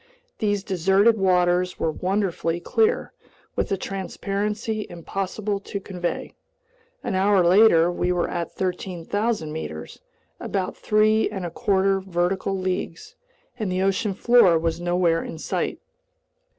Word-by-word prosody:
These 205 -2 0
deserted 195 +4 +3
waters 180 -1 +2
were 160 - 0
wonderfully 180 -1 -1
clear, 450 - +1 0.4
with - - -1
a 195 - +1
transparency 205 +3 -3
impossible 195 +4 -3
to 200 0 -5
convey. 180 -3 -4 0.7
An - - -2
hour 190 0 +3
later 175 -2 +6
we 175 0 0
were 175 -1 0
at 170 -1 -3
13,000 185 0 -2
meters—about 160 - -6
three 215 +1 +2
and 190 -4 -5
a 170 - -4
quarter 195 +2 +1
vertical 190 +1 -1
leagues—and 190 - -5
the 185 +1 0
ocean 195 +1 0
floor 220 -6 +5
was 165 +1 -1
nowhere 175 -1 +1
in - - -7
sight. - - -2
190 Hz, 120 wpm, -24 LUFS, 175-205 Hz, 0.7 s, later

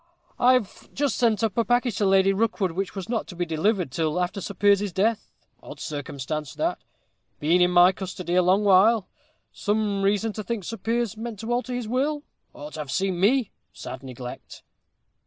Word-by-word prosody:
I've 250 -4 +2
just 285 0 0
sent 230 -3 +2
up 220 -4 0
a - - +4
package 245 -2 +1
to 205 - +2
Lady 195 0 +4
Rookwood, 205 -3 0
which 190 +4 -4
was 195 -1 -5
not 230 -1 -2
to 180 - -9
be 175 0 -1
delivered 170 - 0
till 160 +3 -1
after 180 +2 -2
Sir 200 - -6
Piers's 200 +1 +3
death. 210 +5 0 0.3
Odd - - -11
circumstance 145 0 -5
that 335 +3 -1 0.6
been 165 +4 +3
in 180 - +5
my 180 +1 +6
custody 185 -2 -5
a 180 - +5
long 185 +3 +3
while 205 +2 +5 0.5
some 205 -1 -1
reason 205 +2 +1
to 215 - -5
think 230 -2 -3
Sir 225 +6 -5
Piers 230 -1 -1
meant 225 -1 -6
to 230 +2 -2
alter 245 0 -2
his 245 -3 -4
will 285 +5 -1 0.3
ought 150 +1 -10
to - - -7
have 150 -2 -5
seen 185 +4 -1
me 230 +5 +2 0.2
sad 130 - -8
neglect!" 125 -2 -9
200 Hz, 190 wpm, -25 LUFS, 180-230 Hz, 0.6 s, my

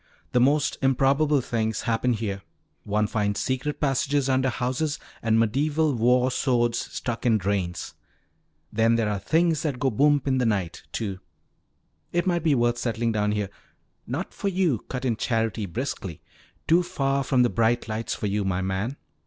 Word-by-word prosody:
"The 125 - +3
most 140 +3 +2
improbable 135 +2 +3
things 110 -3 -1
happen 120 +1 +1
here. 105 -3 -3 0.4
One 105 +1 +1
finds 105 -1 -1
secret 130 +3 -2
passages 140 0 +1
under 130 0 +2
houses 130 +5 -1 0.2
and 115 0 +2
medieval 145 +7 +1
war 125 +2 +3
swords 120 -3 +1
stuck 115 -1 -4
in 115 -3 +4
drains. 95 -3 -2 0.8
Then 115 +2 +3
there 115 -2 +1
are 105 -1 -1
'things 160 - +2
that 150 -6 -2
go 135 0 +1
boomp 145 +4 +3
in 130 -2 +1
the 125 - +1
night,' 95 -6 -1
too. 100 -5 -3 0.9
It 175 +1 0
might 175 -2 +1
be 155 -3 +3
worth 120 -1 +1
settling 115 -1 -1
down 105 -1 +1
here 105 -2 -2 0.3
" - - -45
"Not - - -4
for - - -3
you," 180 - +1
cut 130 0 -4
in 115 -4 +1
Charity 115 -3 -1
briskly. 95 - -4 0.5
"Too 170 +2 +5
far 140 -6 0
from 130 -1 +3
the 120 - +3
bright 115 +1 +1
lights 110 +1 -3
for - - -4
you, 105 0 0
my 95 -1 -1
man." 95 +8 -2
120 Hz, 170 wpm, -25 LUFS, 110-140 Hz, 0.9 s, Too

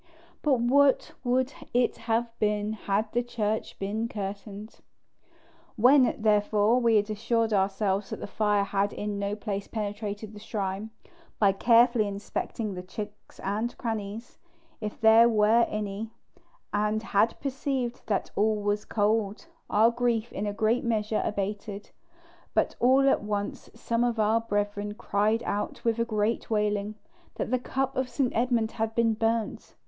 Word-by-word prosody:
But 275 -5 +2
what 275 +3 +3
would 255 +2 +1 0.2
it 245 0 +2
have 230 +1 +1
been 210 0 0
had 210 0 -1
the 240 - +2
church 220 -3 -2
been 215 +4 -2
curtained? 205 0 -7 1.0
When, 255 +3 +5
therefore, 215 +2 +3
we 230 -2 +3
had 205 -1 +3
assured 225 +1 0
ourselves 195 0 0
that - - -5
the - - -5
fire 205 0 +1
had 200 0 0
in 205 -1 -3
no 200 +1 -1
place 205 -2 -4
penetrated 210 0 -4
the 210 - -10
shrine, 205 -1 -3 0.5
by 200 -2 +4
carefully 230 +2 +4
inspecting 200 +1 -4
the 180 - -5
chinks 205 +3 -9
and 215 +5 -2
crannies, 220 0 -5 0.4
if 210 -1 -5
there 225 +1 +7
were 220 +1 +4
any, 210 +1 -4 0.6
and 210 +1 0
had 225 +1 +1
perceived 265 -3 -2
that 205 -3 -1
all 215 +1 +2
was 205 0 -1
cold, 210 +2 0 0.2
our 220 +3 +4
grief 240 -1 -1
in 210 - -3
a - - -1
great 220 +3 +1
measure 220 -2 0
abated: 205 0 -4 0.6
but - - +2
all 265 +2 +5
at - - +3
once 205 -1 -4
some 235 0 -1
of 240 -1 0
our 220 +2 +3
brethren 205 -1 -2
cried 215 +2 0
out 205 +1 -3
with 230 0 +1
a 230 - +2
great 215 0 -1
wailing, 210 -1 0 0.4
that - - -3
the 255 - +2
cup 265 +2 -2
of 260 -1 -1
St. 250 0 -1
Edmund 230 -2 +1
had 225 0 -3
been 230 -1 +3
burnt. 225 0 -2
215 Hz, 150 wpm, -27 LUFS, 205-230 Hz, 1.0 s, there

